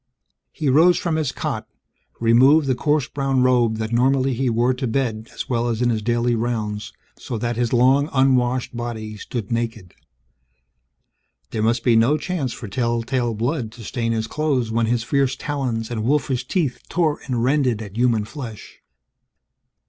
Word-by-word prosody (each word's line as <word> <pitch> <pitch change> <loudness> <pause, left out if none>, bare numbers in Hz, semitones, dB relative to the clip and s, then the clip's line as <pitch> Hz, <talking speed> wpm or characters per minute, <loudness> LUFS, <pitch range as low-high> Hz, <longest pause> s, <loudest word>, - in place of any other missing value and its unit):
He 155 - -3
rose 160 +6 +5
from 170 -3 -1
his 155 -5 0
cot, - - -4 0.5
removed 130 +7 +5
the 130 - +2
coarse 145 +1 +1
brown 135 -2 0
robe 120 -3 +3
that 110 +1 -3
normally 130 +2 +2
he 130 +1 0
wore 120 +2 +2
to 125 0 -3
bed 115 -2 -2
as - - -6
well 120 -1 0
as 115 -2 -1
in 120 -1 +2
his 110 -2 -1
daily 120 +2 +1
rounds 110 -3 -2 0.3
so 120 - -5
that 120 +2 -2
his 120 0 0
long 130 +4 +4
unwashed 130 -2 +2
body 110 -3 -5
stood 110 0 -5
naked. 115 -6 -3 1.6
There 110 - -2
must 115 +2 +1
be 120 -2 +4
no 120 +7 +4
chance 155 -5 -3
for 115 - -7
tell 115 +2 -1
tale 120 -2 -1
blood 120 +1 -2
to 120 - -11
stain 115 +1 -2
his 110 -1 -1
clothes, 130 -3 -1
when 115 0 +1
his 120 0 0
fierce 135 0 +1
talons 125 -6 -3
and 110 -2 -2
wolfish 130 -1 0
teeth 155 -10 -1
tore 160 -4 +1
and 120 -3 -1
rended 130 -4 +2
at 105 -3 -8
human 115 -3 +2
flesh. 115 -4 -9
120 Hz, 170 wpm, -22 LUFS, 115-135 Hz, 1.6 s, rose